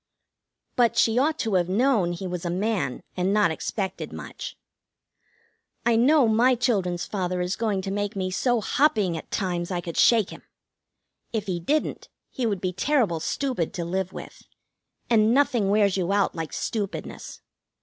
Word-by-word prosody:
But 240 -2 +3
she 230 +2 +4
ought 310 +4 +2
to 220 - -2
have 180 -1 +2
known 210 -4 +2
he 175 +2 -6
was 180 -2 -4
a 175 - -2
man, 190 - -1
and 185 +1 0
not 205 -4 +3
expected 190 +3 -4
much. - - -8 1.3
I 235 -1 +4
know 265 +3 +5
my 240 +4 +4
children's 195 -8 0
father 185 -3 -2
is 180 +2 -1
going 210 -4 -1
to 195 - -3
make 205 0 -2
me 185 -1 -2
so 240 +4 +1
hopping 215 - +2
at 160 - -7
times 175 -3 -2
I 180 -2 -1
could 170 -1 -6
shake 225 -5 +4
him. - - -10 0.9
If 220 -3 -2
he 180 -3 -2
didn't, 295 - -1 0.2
he 250 -4 -1
would 200 -4 -2
be 185 -1 -1
terrible 215 - +1
stupid 250 - -2
to 170 - -3
live 185 +1 -2
with, - - -10 0.7
and 225 0 +4
nothing 245 -8 +2
wears 200 -2 +3
you 185 0 0
out 200 0 +2
like 165 -2 -5
stupidness. 205 -3 -4
200 Hz, 170 wpm, -25 LUFS, 180-230 Hz, 1.3 s, know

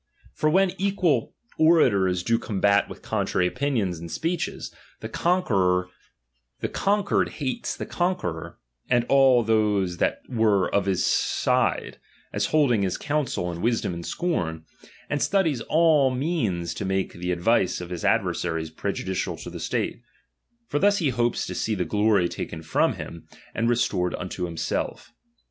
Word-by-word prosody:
i^or 155 - +3
when 190 +2 +4
equal 185 - +1 0.2
orators 100 - +4
do 115 +3 +2
combat 100 -1 +2
with - - -10
contrary 90 - 0
opinions 110 - -1
and 85 0 -8
speeches, 165 +1 -3 0.3
the - - -5
conquered 95 - +1 1.4
hates 130 -5 -3
the - - -4
conqueror 175 - -2 0.3
and 120 -1 +3
all 135 -3 +5
those 105 -5 +1
that - - 0
were 110 -6 +2
of 100 -1 +1
his 95 -2 +1
side, - - +1 0.3
as 100 0 0
holding 140 -9 +3
his 95 -2 -1
council 140 -12 -1
and 85 0 -6
wisdom 115 -4 0
in 85 - -5
scorn, 85 - -2 0.4
and 145 - -2
studies 165 -11 +1
all 155 -4 +4
means 125 - -1
to - - -5
make 95 0 -1
the 90 +1 -3
advice 90 +2 +2
of 90 0 -8
his 90 - -5
adversaries 80 -1 0
pre 100 +5 -2
judicial 95 -1 -3
to - - -8
the - - -7
state: - - -2 0.7
for 145 - -1
thus 205 +2 +4
he 165 -8 +1
hopes 120 -1 0
to - - -5
see 110 - -1
the 90 -2 -1
glory 105 -3 +2
taken 80 -1 -6
from 80 - +2
him, 85 -1 -9 0.3
and 115 +1 0
restored 95 -7 +1
unto 90 0 -4
himself. 85 +7 -3
110 Hz, 150 wpm, -25 LUFS, 90-145 Hz, 1.4 s, all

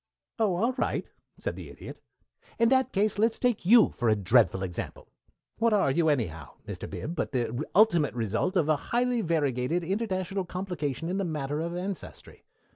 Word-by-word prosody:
"Oh, 210 -5 +2
all 230 +8 +1
right," - - -1 0.3
said - - -4
the - - -9
Idiot. - - -10 0.6
"In 230 0 +4
that 265 0 +3
case, 205 0 +1
let's 225 +1 +2
take 245 -8 0
you 230 +2 +7
for 120 -3 0
a 110 - +4
dreadful 105 -1 +3
example. 90 -2 -6 0.5
What 230 -1 +3
are 195 -9 +3
you, 160 +2 +2
anyhow, 80 - -2
Mr. - - -6
Bib, 165 - -5
but 150 - -3
the 120 +2 -1
ultimate 175 - +4
result 115 - -1
of 165 -5 +2
a 155 -1 +3
highly 245 0 +1
variegated 155 - 0
international 190 0 -2
complication 175 -6 -4
in 185 +3 -1
the - - 0
matter 150 -4 -2
of 170 +2 -3
ancestry? 185 +1 -7
175 Hz, 175 wpm, -28 LUFS, 135-205 Hz, 0.6 s, you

